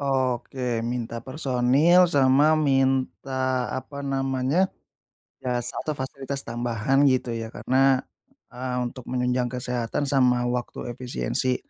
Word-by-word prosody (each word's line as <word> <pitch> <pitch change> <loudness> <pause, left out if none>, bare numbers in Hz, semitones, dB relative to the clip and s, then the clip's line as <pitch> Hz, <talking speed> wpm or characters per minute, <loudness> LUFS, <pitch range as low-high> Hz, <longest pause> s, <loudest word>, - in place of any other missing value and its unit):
Oke, 130 -3 -1
minta 115 0 -3
personil 140 +6 +3
sama 145 +1 +4
minta 130 -2 +1
apa 140 +2 -7
namanya, 135 +5 0 0.7
jasa 120 -2 -3
atau 155 -2 -3
fasilitas 135 +1 -5
tambahan 120 +4 +1
gitu 130 -2 +1
ya? 115 -1 -4
Karena, 135 0 +3 0.5
eee, 125 0 -4
untuk 120 0 -7
menunjang 125 0 0
kesehatan 125 0 -2
sama 125 -3 +3
waktu 125 0 -4
efisiensi. 125 +1 -1
130 Hz, 110 wpm, -25 LUFS, 125-135 Hz, 0.7 s, sama